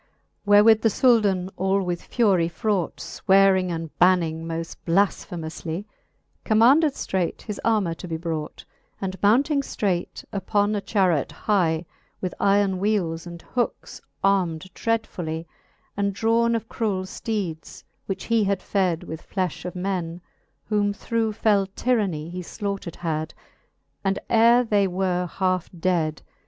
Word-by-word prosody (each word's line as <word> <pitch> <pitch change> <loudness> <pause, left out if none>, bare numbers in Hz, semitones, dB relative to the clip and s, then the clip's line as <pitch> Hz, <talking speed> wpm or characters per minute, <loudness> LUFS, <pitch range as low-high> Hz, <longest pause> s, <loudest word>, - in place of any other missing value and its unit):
Wherewith 210 +2 +6
the 225 - +4
Souldan 205 -6 +3
all 190 +1 +1
with 175 -1 -2
furie 190 -8 +2
fraught, 190 0 -1
Swearing, 190 -2 +3
and 165 -2 -5
banning 165 -3 +3
moft 165 0 -5
blafphemoufly, 170 -1 -1 0.6
Commanded 265 +8 +5
ftraight 185 -9 -2
his 210 -2 -6
armour 215 -7 +2
to 180 - -9
be 165 -1 -3
brought, 160 -2 -5 0.3
And 190 -1 -5
mounting 275 +8 +3
ftraight 190 -9 -2
uppon 205 +2 +1
a 205 - -1
charret 185 - +1
hye, 175 -5 0 0.3
With 185 - -3
yron 195 -1 +3
wheeles 180 -5 0
and 170 0 -9
hookes 245 -2 -3 0.2
arm'd 185 -3 +1
dreadfully, 175 -8 -2 0.5
And 200 0 0
drawne 230 +2 +2
of 225 -1 -3
cruell 205 -6 -1
fteedes, 185 -4 -5 0.2
which 195 - -3
he 230 -2 +2
had 200 -1 -1
fed 185 -5 0
With 160 +1 -9
flefh 185 -4 -2
of 180 - -5
men, 180 -2 -3 0.4
whom 205 -1 0
through 225 +1 -1
fell 205 -2 +2
tyranny 200 -11 0
He 180 +1 -5 0.2
(laughtered 200 -5 -3
had, 160 -2 -3 0.7
and 195 0 +1
ere 235 +2 +6
they 205 -4 +2
were 180 -1 -1
halfe 185 -2 0
ded. 165 -4 0
190 Hz, 135 wpm, -24 LUFS, 175-210 Hz, 0.7 s, Wherewith